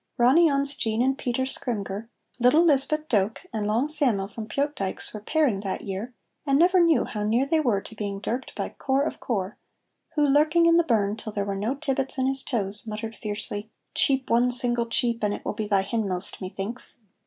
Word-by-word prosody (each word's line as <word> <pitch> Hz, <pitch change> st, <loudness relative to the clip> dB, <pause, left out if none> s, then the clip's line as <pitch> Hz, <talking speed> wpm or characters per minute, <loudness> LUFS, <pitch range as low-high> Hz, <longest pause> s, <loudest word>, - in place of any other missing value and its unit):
Ronny 275 Hz, +8 st, +5 dB
On's 280 Hz, 0 st, +2 dB
Jean 220 Hz, -5 st, -1 dB
and 265 Hz, +1 st, +2 dB
Peter 260 Hz, -1 st, -2 dB
Scrymgeour, 220 Hz, -4 st, -3 dB, 0.3 s
little 265 Hz, +8 st, +5 dB
Lisbeth 305 Hz, +1 st, +2 dB
Doak 210 Hz, -2 st, 0 dB
and 210 Hz, -2 st, -2 dB
long 230 Hz, +7 st, +1 dB
Sam'l 260 Hz, -11 st, +3 dB
from 215 Hz, +1 st, -8 dB
Pyotdykes 275 Hz, -5 st, -2 dB
were 210 Hz, -, -5 dB
pairing 275 Hz, -4 st, +1 dB
that 195 Hz, -1 st, -4 dB
year, 205 Hz, +5 st, -5 dB, 0.3 s
and 275 Hz, -2 st, +2 dB
never 365 Hz, +4 st, +5 dB
knew 335 Hz, -3 st, +4 dB
how 210 Hz, -, -5 dB
near 230 Hz, +5 st, +2 dB
they 320 Hz, +3 st, +2 dB
were 235 Hz, -10 st, +1 dB
to -, -, -11 dB
being 205 Hz, -2 st, -4 dB
dirked 240 Hz, +5 st, -4 dB
by -, -, -3 dB
Corp 275 Hz, +1 st, 0 dB
of -, -, -6 dB
Corp, 200 Hz, -5 st, -3 dB, 0.6 s
who, 295 Hz, -1 st, +3 dB
lurking 305 Hz, +4 st, +4 dB
in 335 Hz, 0 st, +5 dB
the 340 Hz, -, +4 dB
burn 215 Hz, -6 st, +1 dB
till 220 Hz, -, -6 dB
there 200 Hz, -1 st, -2 dB
were 200 Hz, -1 st, -3 dB
no 215 Hz, +7 st, -1 dB
tibbits 270 Hz, -2 st, -2 dB
in 260 Hz, -, +1 dB
his 270 Hz, 0 st, 0 dB
toes, 210 Hz, -3 st, +1 dB
muttered 215 Hz, +1 st, -5 dB
fiercely, 210 Hz, 0 st, -4 dB, 0.2 s
"Cheep 265 Hz, -1 st, +3 dB
one 240 Hz, +2 st, +3 dB
single 240 Hz, -1 st, 0 dB
cheep, 235 Hz, 0 st, 0 dB
and 205 Hz, 0 st, +1 dB
it -, -, -11 dB
will -, -, -2 dB
be 215 Hz, -, -4 dB
thy 200 Hz, -2 st, +2 dB
hinmost, 195 Hz, -3 st, -2 dB
methinks!" 195 Hz, +6 st, -5 dB
235 Hz, 200 wpm, -25 LUFS, 210-275 Hz, 0.6 s, Ronny